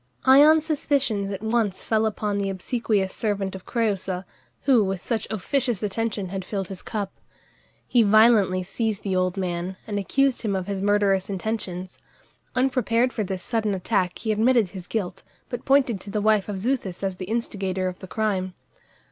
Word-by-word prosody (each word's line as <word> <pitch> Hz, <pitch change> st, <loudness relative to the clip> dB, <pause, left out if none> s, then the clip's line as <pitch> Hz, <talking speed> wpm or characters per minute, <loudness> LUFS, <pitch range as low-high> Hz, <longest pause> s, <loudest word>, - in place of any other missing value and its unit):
Ion's 300 Hz, +4 st, +7 dB
suspicions 275 Hz, -10 st, 0 dB
at 195 Hz, +1 st, -5 dB
once 220 Hz, -3 st, 0 dB
fell 220 Hz, 0 st, +2 dB
upon 210 Hz, -1 st, -2 dB
the 200 Hz, -1 st, -1 dB
obsequious 195 Hz, 0 st, -1 dB
servant 200 Hz, -3 st, -1 dB
of 190 Hz, -1 st, -9 dB
Crëusa, 195 Hz, -5 st, -1 dB, 0.4 s
who 255 Hz, -6 st, +5 dB
with 195 Hz, -1 st, -2 dB
such 225 Hz, +4 st, -2 dB
officious 235 Hz, +1 st, -1 dB
attention 210 Hz, -2 st, -2 dB
had 190 Hz, 0 st, -4 dB
filled 195 Hz, -1 st, -4 dB
his 190 Hz, -2 st, -6 dB
cup. 205 Hz, -3 st, -4 dB, 0.7 s
He 245 Hz, -, +4 dB
violently 210 Hz, -3 st, +5 dB
seized 215 Hz, +2 st, -2 dB
the 190 Hz, -2 st, -1 dB
old 185 Hz, 0 st, 0 dB
man, 180 Hz, 0 st, -3 dB
and 205 Hz, -2 st, -2 dB
accused 275 Hz, +6 st, +1 dB
him 210 Hz, -4 st, -1 dB
of 190 Hz, -1 st, -2 dB
his 200 Hz, -1 st, -3 dB
murderous 200 Hz, -1 st, +2 dB
intentions. 190 Hz, -2 st, -4 dB, 0.6 s
Unprepared 250 Hz, -2 st, +2 dB
for 215 Hz, -, -1 dB
this 190 Hz, -1 st, -4 dB
sudden 220 Hz, -4 st, 0 dB
attack 180 Hz, 0 st, 0 dB
he 220 Hz, -, -2 dB
admitted 225 Hz, -1 st, +3 dB
his 180 Hz, -1 st, -9 dB
guilt, 205 Hz, -5 st, -3 dB, 0.3 s
but 245 Hz, -1 st, -5 dB
pointed 265 Hz, -7 st, +3 dB
to 200 Hz, -, -9 dB
the 210 Hz, +1 st, -1 dB
wife 210 Hz, -1 st, +2 dB
of 205 Hz, -, -3 dB
Xuthus 205 Hz, -5 st, -2 dB
as 190 Hz, -2 st, -2 dB
the 185 Hz, -, -5 dB
instigator 195 Hz, -4 st, -2 dB
of 180 Hz, 0 st, -5 dB
the 190 Hz, -, -9 dB
crime. 190 Hz, -3 st, -1 dB
205 Hz, 175 wpm, -24 LUFS, 190-230 Hz, 0.7 s, Ion's